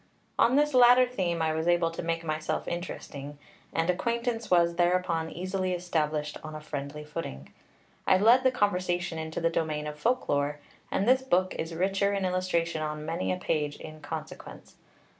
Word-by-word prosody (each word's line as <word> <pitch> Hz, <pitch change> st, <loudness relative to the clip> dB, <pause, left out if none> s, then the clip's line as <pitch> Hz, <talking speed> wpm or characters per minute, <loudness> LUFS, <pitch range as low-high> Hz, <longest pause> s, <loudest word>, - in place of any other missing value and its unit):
On 245 Hz, -, +5 dB
this 295 Hz, 0 st, +3 dB
latter 250 Hz, 0 st, +7 dB
theme 180 Hz, -9 st, -1 dB
I 160 Hz, -1 st, +1 dB
was 160 Hz, +1 st, -2 dB
able 175 Hz, -1 st, +3 dB
to 165 Hz, -, -5 dB
make 165 Hz, 0 st, -2 dB
myself 155 Hz, 0 st, -2 dB
interesting, 145 Hz, -4 st, -6 dB, 0.3 s
and 165 Hz, 0 st, 0 dB
acquaintance 230 Hz, +4 st, -1 dB
was 170 Hz, -1 st, +3 dB
thereupon 175 Hz, -2 st, +1 dB
easily 185 Hz, +1 st, -2 dB
established 155 Hz, -4 st, -1 dB
on 155 Hz, 0 st, -7 dB
a -, -, -5 dB
friendly 150 Hz, 0 st, -6 dB
footing. 150 Hz, -, -7 dB, 0.5 s
I 190 Hz, -, +6 dB
led 230 Hz, +6 st, +6 dB
the 260 Hz, -, +5 dB
conversation 180 Hz, -7 st, 0 dB
into 160 Hz, 0 st, -4 dB
the 165 Hz, 0 st, +1 dB
domain 155 Hz, -2 st, -1 dB
of 150 Hz, 0 st, -6 dB
folk 250 Hz, +7 st, +1 dB
lore; 145 Hz, +1 st, 0 dB, 0.3 s
and 195 Hz, -, 0 dB
this 260 Hz, +1 st, +5 dB
book 185 Hz, -7 st, +1 dB
is 165 Hz, +1 st, -4 dB
richer 195 Hz, +3 st, +1 dB
in 195 Hz, -1 st, 0 dB
illustration 175 Hz, -3 st, 0 dB
on 150 Hz, 0 st, -4 dB
many 165 Hz, +3 st, -1 dB
a 185 Hz, -, -1 dB
page, 150 Hz, -5 st, -1 dB
in 155 Hz, 0 st, -10 dB
consequence. 145 Hz, -, -8 dB
170 Hz, 175 wpm, -28 LUFS, 155-190 Hz, 0.5 s, latter